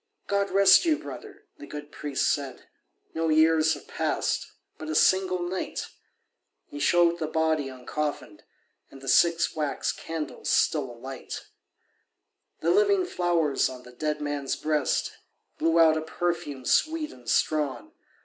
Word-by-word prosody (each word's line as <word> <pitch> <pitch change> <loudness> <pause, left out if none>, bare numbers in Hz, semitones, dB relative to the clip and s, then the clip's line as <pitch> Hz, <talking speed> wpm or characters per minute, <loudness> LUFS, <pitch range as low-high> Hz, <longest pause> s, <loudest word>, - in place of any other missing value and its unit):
"God 200 0 0
rest 195 - +6
you, 320 -3 +2
brother," 415 +3 -10 0.2
the 145 - -10
good 150 0 -8
priest 145 -3 -2
said, 140 -2 -6 0.5
"No 165 0 -1
years 160 0 +4
have - - -13
passed—but 155 - -3
a 155 - -2
single 185 0 +3
night." 185 +1 -4 0.8
He 145 - -9
showed 170 +2 +3
the 155 - -2
body 160 -2 0
uncoffinèd, 140 +3 -5 0.5
And 135 - -13
the 135 - -11
six 170 +5 +3
wax 150 -2 -1
candles 160 -2 -6
still 145 -5 +2
alight. 130 +3 -8 1.2
The - - +2
living 400 -1 +3
flowers 170 - +1
on 125 -1 -10
the 125 - -13
dead 150 +4 -3
man's 145 -2 -2
breast 150 -3 0 0.5
Blew 165 +1 +2
out 160 -1 +6
a - - -2
perfume 160 -5 -3
sweet 315 -1 +1
and 120 -2 -11
strong. 155 - 0
155 Hz, 140 wpm, -26 LUFS, 145-175 Hz, 1.2 s, rest